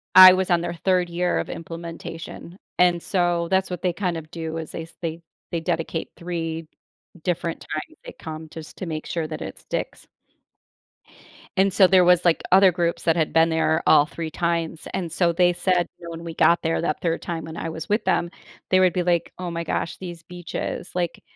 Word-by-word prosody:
I 185 0 +12
was 185 0 0
on 170 -1 +4
their 175 0 -3
3rd 180 0 +1
year 175 +1 0
of - - -4
implementation. 165 +1 -8 0.2
And, 175 -1 +4
so, 175 -2 +1
that's 190 0 +2
what 180 -1 -5
they 180 -2 0
kind 180 -2 -2
of 155 -1 -9
do, 160 -1 -4
is 160 -1 -6
they 165 - -6
they 165 -1 -4 0.3
they 170 - -1
dedicate 165 -1 -2
3 165 -2 -4 0.6
different 170 -1 -1
times 155 - -6
they - - -8
come 160 0 -7
just 160 -1 -10
to 185 - -4
make 155 -1 -4
sure 165 -2 -2
that 155 0 -6
it - - -7
sticks. - - -5 1.5
And, 195 0 +4
so, 190 -1 +6
there 185 0 +6
was, 180 0 +5
like, 170 -2 +3
other 190 0 +8
groups 170 -1 -1
that 165 0 +2
had 160 -2 +1
been 165 0 +5
there 160 0 +1
all 150 -2 +7
three - - -19
3 160 -1 -3
times, 170 -1 -1
and 180 -3 -2
so 170 0 +2
they 175 +1 +4
said, 180 0 +1
when 170 -1 -7
we 165 - -5
got 170 +2 +4
there 165 0 0
that 170 - -1
3rd 165 -1 0
time, 165 -2 -4
when 160 0 -8
I - - -4
was 160 0 -6
with 210 +3 +1
them, 175 -2 +1 0.4
they 185 - +5
would 185 -1 +4
be 180 - 0
like, 175 -1 +1
"Oh 180 - -4
my 170 0 -3
gosh, 165 - -2
these 175 -3 -8
beaches, 175 +1 -5
like, 175 -2 -2
170 Hz, 210 wpm, -24 LUFS, 165-180 Hz, 1.5 s, I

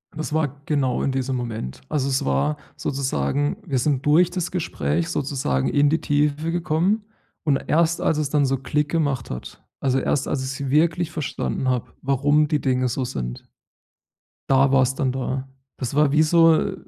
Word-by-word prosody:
Das 155 -1 -4
war 145 -3 -1
genau 135 -5 0
in 135 - +1
diesem 130 0 -1
Moment. 115 - -5
Also, 145 -3 0
es 130 - 0
war 70 - +1 0.2
sozusagen 140 - -1
wir 135 -6 -1
sind 140 0 0
durch 165 +4 +5
das 180 -1 -3
Gespräch 165 -1 -1
sozusagen 130 - -1
in 145 0 +3
die 160 - +1
Tiefe 150 +2 0
gekommen. 175 +5 +1 0.4
Und 145 -3 +2
erst, 170 +1 +2
als 155 - +1
es 150 -2 -1
dann 145 -1 +2
so 135 0 +1
Klick 150 +3 -1
gemacht 145 -7 -1
hat 60 - -8 0.2
also 135 -1 +1
erst, 135 +1 0
als 130 - -1
ich's 130 0 -4
wirklich 165 +2 +2
verstanden 140 -3 -2
habe, 125 -2 -2
warum 145 +3 +2
die 150 -1 +1
Dinge 130 -1 +1
so 125 +2 -2
sind. 60 - -5 1.0
Da 135 0 +4
war's 130 -1 +3
dann 130 -3 0
da. 130 +1 -3 0.3
Das 125 0 -4
war 145 0 +3
wie 155 +2 +4
so 165 +3 +4
145 Hz, 175 wpm, -23 LUFS, 130-155 Hz, 1.0 s, durch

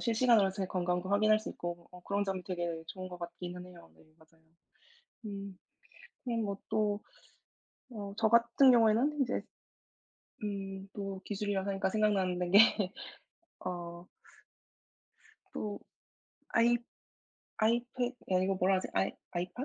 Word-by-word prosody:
실시간으로 230 -4 +4
제 190 0 -3
건강도 180 0 -1
확인할 215 +1 +5
수 215 - -6
있고 175 0 -6
어 180 - -12
그런 200 0 0
점이 190 -2 -2
되게 175 -3 -3
좋은 185 +2 -7
것 180 -1 -9
같기는 175 +1 -7
해요. 175 -2 -14
네 - - -22 0.2
맞아요. 160 0 -25 0.8
음. 200 -2 -6 0.7
그럼 230 -2 -1
뭐 200 -1 -2
또 210 -1 +1 0.9
어 205 -3 -6
저 225 -1 +3
같은 235 +3 +6
경우에는 240 +5 +4
이제 255 -1 0 1.0
음 195 -1 -4
또 195 -2 -4
기술이라고 200 -1 -2
하니까 195 -1 0
생각나는 190 -4 +1
게 200 -1 +6 0.7
어. 175 -1 -5 1.5
또 205 -1 -4 0.7
아이 240 +1 +4 0.8
아이패 240 +2 +1 0.2
아 185 - +4
이거 195 +1 +1
뭐라 190 +1 +3
하지? 185 - -3
아이 95 +1 +2 0.2
아이팟? 180 +8 -3
195 Hz, 255 characters per minute, -32 LUFS, 180-215 Hz, 1.5 s, 같은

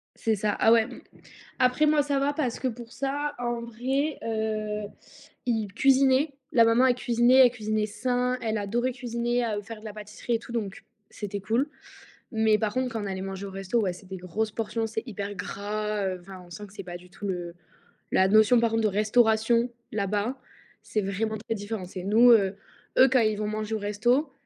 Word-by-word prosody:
C'est 225 -1 0
ça, 210 0 0
ah 225 - +5
ouais 230 -1 +6
m 245 +2 -8 0.6
après 255 +4 +3
moi, 300 -1 +4
ça 280 -1 0
va, 280 +1 +1
parce 265 -6 -2
que 260 - 0
pour 235 0 -8
ça, 285 +2 -2
en 240 -1 -2
vrai, 265 +6 -2
heu, 215 -1 -2 0.6
ils 220 -4 0
cuisinaient. 270 +2 +4 0.2
La 230 - +6
maman, 230 +3 +4
elle 250 - +4
cuisinait, 245 +1 +3
elle - - +2
cuisinait 215 -2 -1
sain, 250 +4 0
elle 220 -1 -1
adorait 240 +5 -1
cuisiner, 240 0 -1
à, 220 -3 -1
heu, 205 - -5
faire 215 +1 -9
de - - -16
la 215 - -6
pâtisserie 210 +3 -5
et - - +2
tout 235 - -11
donc, 205 -5 -4 0.3
c'était 205 -1 -5
cool, 235 +8 0 0.6
mais 220 -1 +3
par 215 -2 -1
contre 255 -2 -1
quand 220 -2 -3
on - - -4
allait 190 -1 -3
manger 195 +1 -5
au - - -7
resto, 195 +4 -1
ouais, 185 -4 0
c'est 180 +2 -13
des 190 0 -6
grosses 185 +5 -3
portions, 225 +1 -2
c'est 220 0 -3
hyper 205 -2 -5
gras, 205 +2 -3
heu, 185 -1 -3
enfin, 185 0 -11
on - - -18
sent 205 +5 -8
que 195 - -18
c'est 205 - -7
pas 175 -1 -7
du 180 +1 -14
tout, 200 +3 -6
heu, 175 -2 -4 0.6
la 190 - +4
notion 215 +4 +5
par 230 - +2
contre 225 0 +1
de 215 - +4
restauration 220 +3 +3 0.2
là-bas, 210 +4 -1 0.5
c'est 215 - -1
vraiment 215 +3 -2
très 225 +1 -4
différent. 205 -2 -5
C'est 185 0 -7
nous, 225 +5 +6
heu, 200 -4 +4 0.4
eux 260 0 +8
quand 260 - +5
ils 215 -1 +1
vont 210 - -2
manger 215 +1 -3
au 215 - -2
resto, 240 +8 +1
220 Hz, 215 wpm, -27 LUFS, 205-245 Hz, 0.6 s, eux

